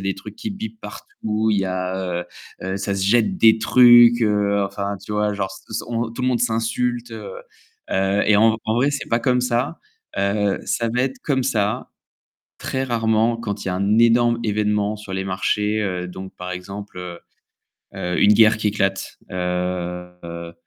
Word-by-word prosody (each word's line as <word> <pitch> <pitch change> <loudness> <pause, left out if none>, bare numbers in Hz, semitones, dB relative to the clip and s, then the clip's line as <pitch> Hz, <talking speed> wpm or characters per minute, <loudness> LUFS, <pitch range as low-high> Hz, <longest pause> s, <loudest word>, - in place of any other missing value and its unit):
des 95 0 -1
trucs 95 - -10
qui 230 -1 -5
bipent 220 +2 -7
partout, 110 0 -4
il 105 - +2
y 95 - 0
a, 90 -1 -2
heu - - -14 0.4
heu, 95 +1 -3
ça 100 0 -2
se 95 -1 -1
jette 120 - +3
des 110 -5 +6
trucs, 120 0 +7
heu, 100 -1 +2
enfin 100 +1 -4
tu 105 - -6
vois, 105 0 +1
genre 95 -1 -2
s - - -29
s 110 - -3
on 115 -1 -2
tout 125 +2 -6
le - - +1
monde 120 -2 +1
s'insulte, 120 +1 -1
heu 105 -3 -7 0.6
heu, 95 +1 +1
et 105 - +5
en 110 +1 +4
vrai 120 +6 +2
c'est 140 - -4
pas 115 - +1
comme 125 0 +2
ça, 125 +5 -1 0.4
heu, 100 0 +1
ça 115 - -1
va 125 - +1
être 130 0 -2
comme 135 -3 0
ça 105 -5 -1 0.7
très 130 0 -2
rarement 115 -1 +1
quand 105 -3 -5
il - - -3
y - - 0
a - - -2
un 100 +3 +1
énorme 115 0 +4
événement 105 -1 0
sur 105 -2 -9
les 95 0 -2
marchés, 105 +3 0
heu, 90 -3 -2
donc 95 +1 -9
par 90 0 -6
exemple, 100 +2 -8
heu 90 -1 -7 0.8
heu, 90 0 -1
une 105 - +6
guerre 110 0 +6
qui 110 - 0
éclate, 95 -1 -2
heu, 90 -1 -4
105 Hz, 190 wpm, -21 LUFS, 95-115 Hz, 0.8 s, trucs